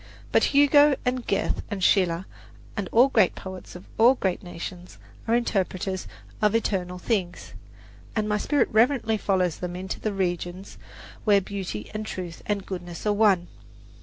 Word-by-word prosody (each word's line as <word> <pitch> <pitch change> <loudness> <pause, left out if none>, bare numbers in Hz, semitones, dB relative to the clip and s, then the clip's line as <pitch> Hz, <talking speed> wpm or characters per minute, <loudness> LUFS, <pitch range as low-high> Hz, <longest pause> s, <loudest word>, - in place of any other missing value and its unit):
But - - +4
Hugo 290 0 +5
and 250 -1 -1
Goethe 195 - 0
and 200 -3 -4
Schiller 180 -2 +3 0.5
and 200 -3 -3
all 245 +4 +6
great 215 -8 +3
poets 190 -2 -9
of 180 - -10
all 240 +4 +7
great 190 -7 -1
nations 175 0 -8 0.3
are 230 - +3
interpreters 190 -5 -1 0.3
of 210 0 +3
eternal 185 -5 -1
things, 180 -3 -2 0.6
and 215 -1 0
my 210 0 0
spirit 285 +1 +2
reverently 225 0 +3
follows 185 -5 0
them 180 -1 -5
into 185 +1 -5
the 215 - -2
regions 180 -1 -3 0.4
where 205 -2 +5
Beauty 190 - -6
and 215 0 -3
Truth 180 -5 -6
and 205 -2 -1
Goodness 175 -1 -7
are 210 - +3
one. 200 -4 +3
195 Hz, 155 wpm, -25 LUFS, 180-220 Hz, 0.6 s, all